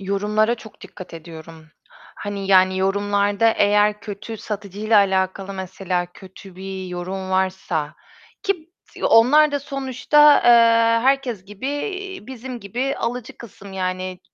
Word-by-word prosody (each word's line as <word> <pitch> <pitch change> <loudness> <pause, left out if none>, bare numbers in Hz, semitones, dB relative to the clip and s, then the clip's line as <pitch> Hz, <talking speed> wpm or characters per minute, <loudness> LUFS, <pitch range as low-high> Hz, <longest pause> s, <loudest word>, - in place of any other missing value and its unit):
Yorumlara 210 +4 0
çok 220 -2 -15
dikkat 185 -3 -11
ediyorum. 160 -1 -11 0.5
Hani, 200 -1 -5
yani, 185 0 +4
yorumlarda 205 +2 +1
eğer 210 +1 +3
kötü 215 +2 -7
satıcıyla 210 +1 -1
alakalı 190 0 0
mesela, 185 -1 -3
kötü 190 -1 -14
bir 190 0 -6
yorum 185 +1 -5
varsa, 185 -5 -1 0.5
ki 355 -5 -3 0.3
b - - -6
onlar 290 +6 +5
da 285 - -1
sonuçta, 275 +2 +3
eee, 230 -1 +5
herkes 260 -8 +1
gibi 205 +7 -6 0.6
bizim 255 -1 -8
gibi 250 +7 -3
alıcı 235 0 -4
kısım, 200 -3 -12
yani 185 0 -4
200 Hz, 120 wpm, -21 LUFS, 190-230 Hz, 0.6 s, onlar